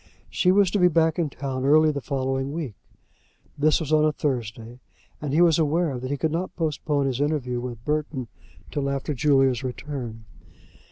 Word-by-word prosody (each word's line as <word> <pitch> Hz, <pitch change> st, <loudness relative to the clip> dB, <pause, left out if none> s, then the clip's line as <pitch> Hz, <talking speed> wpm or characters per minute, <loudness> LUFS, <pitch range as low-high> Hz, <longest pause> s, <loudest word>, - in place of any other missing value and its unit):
She 180 Hz, -, +3 dB
was 195 Hz, -1 st, +4 dB
to 205 Hz, -, +1 dB
be 180 Hz, -, +6 dB
back 165 Hz, -1 st, +2 dB
in 160 Hz, -3 st, +1 dB
town 135 Hz, -1 st, -4 dB
early 155 Hz, +3 st, +5 dB
in -, -, 0 dB
the 140 Hz, -, -4 dB
following 135 Hz, 0 st, -2 dB
week. 150 Hz, -7 st, -4 dB, 0.8 s
This 150 Hz, +1 st, +3 dB
was 155 Hz, -2 st, -2 dB
on 155 Hz, 0 st, +5 dB
a 155 Hz, -, +3 dB
Thursday, 120 Hz, -4 st, -4 dB, 0.4 s
and 150 Hz, -2 st, -3 dB
he 155 Hz, +4 st, +3 dB
was 170 Hz, -2 st, +5 dB
aware 155 Hz, -3 st, +1 dB
that 130 Hz, +1 st, -5 dB
he 145 Hz, -, -1 dB
could 160 Hz, +2 st, 0 dB
not 180 Hz, +3 st, -3 dB
postpone 150 Hz, -3 st, -1 dB
his 135 Hz, 0 st, -1 dB
interview 140 Hz, -5 st, -1 dB
with 120 Hz, -2 st, -7 dB
Burton 150 Hz, -4 st, -2 dB, 0.4 s
till 140 Hz, -2 st, -1 dB
after 140 Hz, +2 st, -2 dB
Julia's 135 Hz, -1 st, +2 dB
return. 125 Hz, -4 st, -6 dB
145 Hz, 185 wpm, -25 LUFS, 130-155 Hz, 0.8 s, be